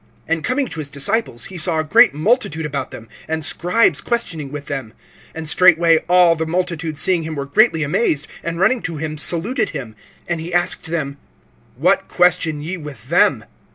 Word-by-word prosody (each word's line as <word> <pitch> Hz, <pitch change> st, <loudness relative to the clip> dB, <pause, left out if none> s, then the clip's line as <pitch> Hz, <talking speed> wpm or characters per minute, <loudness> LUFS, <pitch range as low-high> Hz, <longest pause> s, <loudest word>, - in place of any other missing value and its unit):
(14)And 165 Hz, -1 st, -1 dB
coming 260 Hz, +1 st, 0 dB
to 165 Hz, -, -6 dB
his 145 Hz, -2 st, -4 dB
disciples 140 Hz, -, -1 dB
he 185 Hz, -2 st, -5 dB
saw 160 Hz, +1 st, +1 dB
a 155 Hz, -, +1 dB
great 155 Hz, -, +5 dB
multitude 160 Hz, -, 0 dB
about 145 Hz, -2 st, -4 dB
them, 115 Hz, -, -11 dB, 0.2 s
and 160 Hz, 0 st, -2 dB
scribes 180 Hz, +9 st, +1 dB
questioning 165 Hz, -, -2 dB
with 145 Hz, -1 st, -7 dB
them. 135 Hz, -6 st, -6 dB, 0.4 s
(15)And 160 Hz, -1 st, -6 dB
straightway 165 Hz, -1 st, +5 dB
all 180 Hz, -2 st, +5 dB
the 160 Hz, 0 st, -3 dB
multitude 170 Hz, -2 st, -2 dB
seeing 175 Hz, +2 st, +2 dB
him 160 Hz, 0 st, -5 dB
were 140 Hz, -1 st, -4 dB
greatly 160 Hz, +2 st, +3 dB
amazed, 145 Hz, -1 st, 0 dB, 0.2 s
and 170 Hz, 0 st, -4 dB
running 220 Hz, +6 st, +2 dB
to 165 Hz, -2 st, -5 dB
him 155 Hz, 0 st, -4 dB
saluted 210 Hz, -, +1 dB
him. 125 Hz, -8 st, -7 dB, 0.3 s
(16)And 175 Hz, -1 st, -2 dB
he 165 Hz, +2 st, -7 dB
asked 175 Hz, 0 st, -1 dB
them: 150 Hz, -4 st, -3 dB, 0.6 s
What -, -, +2 dB
question 175 Hz, -4 st, +2 dB
ye 175 Hz, +5 st, -5 dB
with 140 Hz, -7 st, -10 dB
them? 140 Hz, -9 st, +3 dB
160 Hz, 185 wpm, -19 LUFS, 150-180 Hz, 0.6 s, great